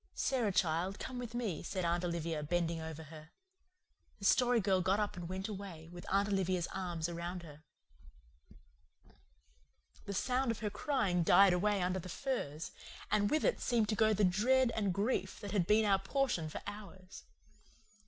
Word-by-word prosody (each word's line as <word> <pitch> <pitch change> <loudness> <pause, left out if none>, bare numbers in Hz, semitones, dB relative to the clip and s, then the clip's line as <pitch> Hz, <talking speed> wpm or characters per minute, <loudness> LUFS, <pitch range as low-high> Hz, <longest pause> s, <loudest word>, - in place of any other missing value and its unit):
"Sara, 245 -6 +1
child, 180 +2 0
come 255 -1 -5
with 240 -1 -6
me," 225 -9 -2
said 185 0 -3
Aunt 170 +1 0
Olivia, 170 -2 -2
bending 170 +1 -1
over 160 0 -6
her. 155 0 -12 0.9
The 200 - -7
Story 245 +2 +4
Girl 190 -2 +2
got 190 +3 +2
up 210 -1 -1
and 175 -1 -6
went 190 +2 -3
away, 190 -6 -7
with 175 0 -10
Aunt 200 +1 +3
Olivia's 185 -3 0
arms 175 -4 -2
around 175 +1 -5
her. 150 -2 -12 2.4
The 200 - -4
sound 255 +4 +1
of 230 - 0
her 210 -1 -2
crying 210 - 0
died 185 +3 +6
away 200 +1 +1
under 185 +1 0
the 185 - -8
firs, 165 - -3 0.4
and 205 -1 +3
with 310 - +1
it - - +1
seemed 230 -4 +1
to 215 - +1
go 220 0 +4
the 210 -1 +2
dread 235 +7 +3
and 205 -3 0
grief 200 0 -1
that 205 -2 -6
had 185 -5 +1
been 215 +1 +4
our 195 -2 +4
portion 195 - 0
for - - -7
hours. 200 -2 -9
190 Hz, 175 wpm, -34 LUFS, 175-215 Hz, 2.4 s, died